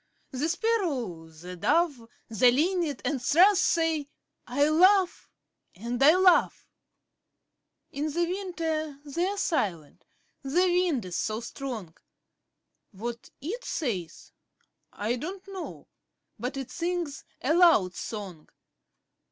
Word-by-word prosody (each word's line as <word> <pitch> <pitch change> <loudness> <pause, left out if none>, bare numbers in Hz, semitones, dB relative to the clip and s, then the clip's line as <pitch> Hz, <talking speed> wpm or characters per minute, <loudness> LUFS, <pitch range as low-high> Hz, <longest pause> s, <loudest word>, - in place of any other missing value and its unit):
The 285 +4 -1
Sparrow, 305 - -1
the 175 +3 -10
Dove, 280 - +1 0.2
The 235 +2 +4
Linnet 315 +1 0
and 270 -1 -1
Thrush 365 +10 +5
say, 325 -5 +1 0.4
'I 285 +4 +2
love 370 +4 +4 0.5
and 235 +6 -4
I 305 +5 +7
love!' 370 -2 +4 1.3
In 300 +2 -3
the 345 +3 +1
winter 330 -5 -3
they're 350 +8 -2
silent 185 - -2 0.4
the 305 +7 +2
wind 350 - +1
is 180 - -4
so 215 0 -2
strong; 230 -7 -6 1.0
What 235 +3 -7
it 425 - -5
says, 205 - -4 0.6
I 225 +4 -2
don't 370 +9 -7
know, 385 -2 -8 0.5
but 250 +4 -4
it 270 -2 -6
sings 345 -5 -3 0.2
a 280 +5 +1
loud 325 - +5
song. 190 -6 -7
290 Hz, 110 wpm, -27 LUFS, 235-350 Hz, 1.3 s, I